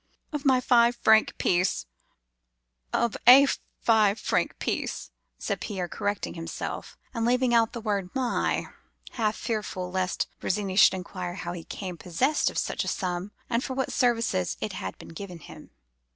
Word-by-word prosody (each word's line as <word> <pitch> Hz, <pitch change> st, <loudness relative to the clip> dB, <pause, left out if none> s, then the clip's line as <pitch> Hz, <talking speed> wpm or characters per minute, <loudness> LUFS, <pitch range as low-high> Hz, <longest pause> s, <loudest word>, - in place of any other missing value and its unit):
"'Of 295 Hz, -1 st, -3 dB
my 260 Hz, -2 st, +5 dB
five 240 Hz, -1 st, +4 dB
franc 220 Hz, -2 st, +4 dB
piece—of -, -, -3 dB
a 270 Hz, +3 st, +10 dB, 0.4 s
five 220 Hz, -2 st, +4 dB
franc -, -, 0 dB
piece,' -, -, -3 dB, 0.3 s
said -, -, -3 dB
Pierre, 190 Hz, -4 st, -3 dB
correcting 205 Hz, +3 st, -3 dB
himself, 165 Hz, -1 st, -6 dB, 0.2 s
and 230 Hz, -2 st, -2 dB
leaving 250 Hz, +1 st, +2 dB
out 230 Hz, -1 st, +3 dB
the 235 Hz, -, -5 dB
word 200 Hz, -4 st, -1 dB
my, 255 Hz, -3 st, 0 dB, 0.5 s
half 215 Hz, -3 st, 0 dB
fearful 190 Hz, -5 st, -3 dB
lest 185 Hz, 0 st, -1 dB
Virginie 195 Hz, -1 st, -1 dB
should 190 Hz, -, +7 dB
inquire 180 Hz, -1 st, -5 dB
how 175 Hz, -2 st, -5 dB
he 175 Hz, -, -6 dB
became 180 Hz, +1 st, -6 dB
possessed 250 Hz, -, +1 dB
of -, -, -8 dB
such -, -, -1 dB
a -, -, -6 dB
sum, 180 Hz, +1 st, -2 dB, 0.2 s
and 240 Hz, +1 st, 0 dB
for 260 Hz, -, -4 dB
what 265 Hz, 0 st, -2 dB
services 230 Hz, -, +1 dB
it -, -, -3 dB
had 95 Hz, 0 st, -5 dB
been -, -, -12 dB
given 180 Hz, +2 st, -8 dB
him. 160 Hz, -, -13 dB
200 Hz, 155 wpm, -27 LUFS, 175-235 Hz, 0.5 s, a